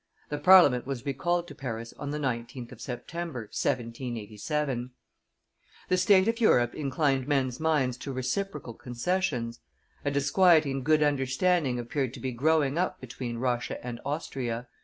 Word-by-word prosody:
The 145 Hz, -, -3 dB
Parliament 145 Hz, -7 st, +6 dB
was 135 Hz, -3 st, -4 dB
recalled 175 Hz, +6 st, 0 dB
to -, -, -9 dB
Paris 115 Hz, -3 st, -6 dB
on 145 Hz, -, -4 dB
the 150 Hz, -, -2 dB
19th 125 Hz, -2 st, -3 dB
of -, -, -12 dB
September, 155 Hz, +2 st, -5 dB
1787. 120 Hz, +3 st, -3 dB, 1.0 s
The 185 Hz, -, +4 dB
state 190 Hz, +1 st, +5 dB
of 230 Hz, +1 st, 0 dB
Europe 120 Hz, -, +4 dB
inclined 135 Hz, -2 st, 0 dB
men's 130 Hz, -4 st, 0 dB
minds 150 Hz, -6 st, +1 dB
to 140 Hz, -, -6 dB
reciprocal 130 Hz, +1 st, -3 dB
concessions; 125 Hz, -1 st, -2 dB, 0.4 s
a 145 Hz, -, +1 dB
disquieting 145 Hz, 0 st, +3 dB
good 155 Hz, +2 st, +3 dB
understanding 140 Hz, +1 st, +1 dB
appeared 125 Hz, +1 st, -2 dB
to -, -, -9 dB
be 130 Hz, -, -3 dB
growing 145 Hz, +3 st, +2 dB
up 180 Hz, -, -1 dB
between 120 Hz, -1 st, -6 dB
Russia 120 Hz, -1 st, -1 dB
and 120 Hz, -1 st, -5 dB
Austria. 125 Hz, -5 st, -3 dB
135 Hz, 140 wpm, -28 LUFS, 120-155 Hz, 1.0 s, Parliament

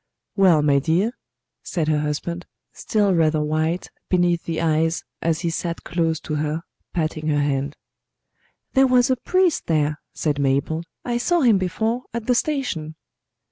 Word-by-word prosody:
"Well, 180 Hz, -7 st, +5 dB
my 140 Hz, -2 st, +4 dB
dear?" 170 Hz, -, +1 dB, 0.5 s
said 165 Hz, -4 st, -2 dB
her 155 Hz, -1 st, +2 dB
husband, 150 Hz, +4 st, -3 dB, 0.3 s
still 205 Hz, -3 st, +1 dB
rather 160 Hz, -2 st, +3 dB
white 155 Hz, +3 st, -1 dB, 0.2 s
beneath 175 Hz, -2 st, +2 dB
the 165 Hz, -1 st, -2 dB
eyes 160 Hz, 0 st, +1 dB, 0.2 s
as 165 Hz, -1 st, 0 dB
he 170 Hz, -2 st, -1 dB
sat 170 Hz, 0 st, -3 dB
close 165 Hz, -2 st, 0 dB
to 155 Hz, -, -5 dB
her 155 Hz, +2 st, -2 dB, 0.3 s
patting 155 Hz, -2 st, -2 dB
her 145 Hz, -1 st, +2 dB
hand. 140 Hz, 0 st, -1 dB, 1.0 s
"There 270 Hz, -1 st, +5 dB
was 250 Hz, 0 st, +4 dB
a -, -, +4 dB
priest 365 Hz, +6 st, +1 dB
there," 150 Hz, -2 st, +1 dB
said 150 Hz, -2 st, -1 dB
Mabel. 140 Hz, +4 st, +1 dB, 0.2 s
"I 240 Hz, -1 st, 0 dB
saw 345 Hz, +7 st, +2 dB
him 230 Hz, -7 st, +5 dB
before, 220 Hz, +7 st, -1 dB
at 235 Hz, -2 st, -3 dB
the 250 Hz, -, +3 dB
station." 235 Hz, -, -1 dB
165 Hz, 155 wpm, -22 LUFS, 155-210 Hz, 1.0 s, Well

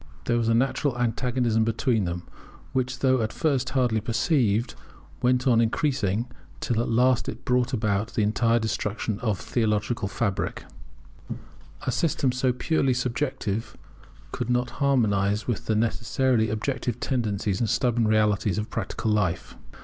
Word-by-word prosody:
There 120 Hz, -, +1 dB
was 115 Hz, -1 st, 0 dB
a 115 Hz, -, +3 dB
natural 135 Hz, +1 st, +1 dB
antagonism 120 Hz, -1 st, +1 dB
between 115 Hz, -1 st, +1 dB
them, 85 Hz, 0 st, -4 dB, 0.5 s
which 130 Hz, -1 st, -1 dB
though 130 Hz, -2 st, +3 dB
at 110 Hz, 0 st, -1 dB
first 135 Hz, -5 st, 0 dB
hardly 125 Hz, -5 st, +1 dB
perceived, 115 Hz, -, +1 dB, 0.5 s
went 125 Hz, 0 st, +2 dB
on 120 Hz, -3 st, +4 dB
increasing 115 Hz, -, 0 dB, 0.3 s
till 115 Hz, -2 st, 0 dB
at -, -, -2 dB
last 125 Hz, +2 st, +3 dB
it 120 Hz, +4 st, -8 dB
brought 125 Hz, -1 st, +1 dB
about 105 Hz, -3 st, -1 dB
the 110 Hz, -, +2 dB
entire 115 Hz, +2 st, +2 dB
destruction 110 Hz, -1 st, -2 dB
of 110 Hz, -6 st, 0 dB
the -, -, -10 dB
theological 110 Hz, -2 st, 0 dB
fabric. 100 Hz, -1 st, -2 dB, 1.2 s
A -, -, +1 dB
system 140 Hz, -5 st, +1 dB
so 125 Hz, +1 st, +1 dB
purely 130 Hz, 0 st, +1 dB
subjective 125 Hz, -4 st, -2 dB, 0.5 s
could 125 Hz, -1 st, -4 dB
not 125 Hz, 0 st, +1 dB
harmonize 105 Hz, -7 st, +2 dB
with 120 Hz, -4 st, -3 dB
the 110 Hz, -, +2 dB
necessarily 115 Hz, +1 st, +1 dB
objective 120 Hz, +2 st, -2 dB
tendencies 105 Hz, -7 st, -1 dB
and 115 Hz, -, 0 dB
stubborn 120 Hz, -3 st, +1 dB
realities 105 Hz, -3 st, +2 dB
of 105 Hz, +1 st, -3 dB
practical 110 Hz, -, -2 dB
life. 105 Hz, -5 st, -1 dB
115 Hz, 145 wpm, -25 LUFS, 110-125 Hz, 1.2 s, on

